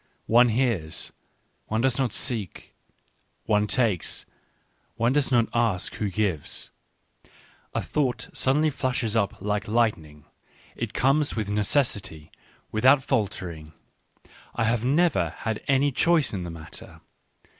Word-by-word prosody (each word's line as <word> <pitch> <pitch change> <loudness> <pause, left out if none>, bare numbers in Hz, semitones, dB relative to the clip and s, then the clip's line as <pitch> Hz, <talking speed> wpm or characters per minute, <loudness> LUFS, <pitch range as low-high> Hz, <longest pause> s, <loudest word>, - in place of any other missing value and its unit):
One 120 +2 +5
hears 110 -10 -1 0.3
— - - -44
one 110 +1 0
does 130 0 +1
not 130 -4 +1
seek; 110 - -3 0.7
one 105 -1 +2
takes 110 -8 +1 0.3
— - - -42
one 120 +3 +1
does 145 -1 +1
not 120 -2 +4
ask 115 -6 0
who 105 - -2
gives: 95 -5 -2 1.0
a - - 0
thought 125 -6 -1
suddenly 150 +4 +2
flashes 125 -5 -1
up 100 -3 0
like 105 0 -1
lightning, 85 -10 -1 0.5
it - - -5
comes 140 +3 +2
with 105 -2 -2
necessity, 100 - 0 0.4
without 130 +5 +4
faltering 90 - -3 0.4
— - - -25
I 115 - 0
have 115 0 +1
never 135 - +2
had 110 -1 -3
any 140 +1 +3
choice 165 0 +2
in 90 -3 -3
the - - -5
matter. 80 -1 -10
115 Hz, 135 wpm, -25 LUFS, 100-130 Hz, 1.0 s, One